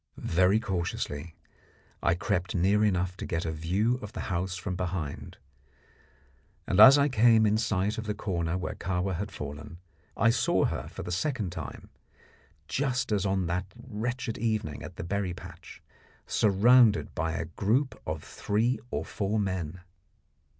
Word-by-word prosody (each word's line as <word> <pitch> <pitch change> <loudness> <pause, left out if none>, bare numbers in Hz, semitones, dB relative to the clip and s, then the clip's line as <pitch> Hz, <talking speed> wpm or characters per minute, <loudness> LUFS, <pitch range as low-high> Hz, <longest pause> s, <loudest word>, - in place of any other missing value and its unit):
Very 90 +5 +3
cautiously 85 -6 -3 0.7
I 85 - +2
crept 95 -1 -1
near 100 +4 +3
enough 90 -3 +1
to - - -5
get 85 0 -2
a 80 - -1
view 95 +10 0
of 105 - -8
the - - -4
house 90 +1 -1
from 90 +1 -4
behind, 90 -5 -4 1.3
and - - 0
as 135 +2 +11
I 140 0 +4
came 115 -3 +5
in 105 +1 +2
sight 105 0 0
of 110 - -5
the 105 - -1
corner 85 -4 -2
where 95 - -3
Kahwa 95 +1 -2
had 100 +4 -4
fallen 75 +3 -7 0.4
I 115 0 +4
saw 120 - +2
her - - -3
for - - -8
the 90 - -5
second 105 - -1
time 80 -5 -8 0.8
just 125 -4 -1
as 100 -2 +1
on 95 -1 0
that 90 +2 -2
wretched 120 0 -4
evening 110 -9 -1
at - - -9
the - - -6
berry 95 0 -2
patch 85 0 -12 0.4
surrounded 110 +2 +4
by 80 -1 -1
a 85 - -2
group 110 - 0
of 80 -1 -3
three 115 +5 0
or 75 +2 -3
four 105 +1 -2
men. 90 -3 -3
95 Hz, 155 wpm, -28 LUFS, 85-110 Hz, 1.3 s, as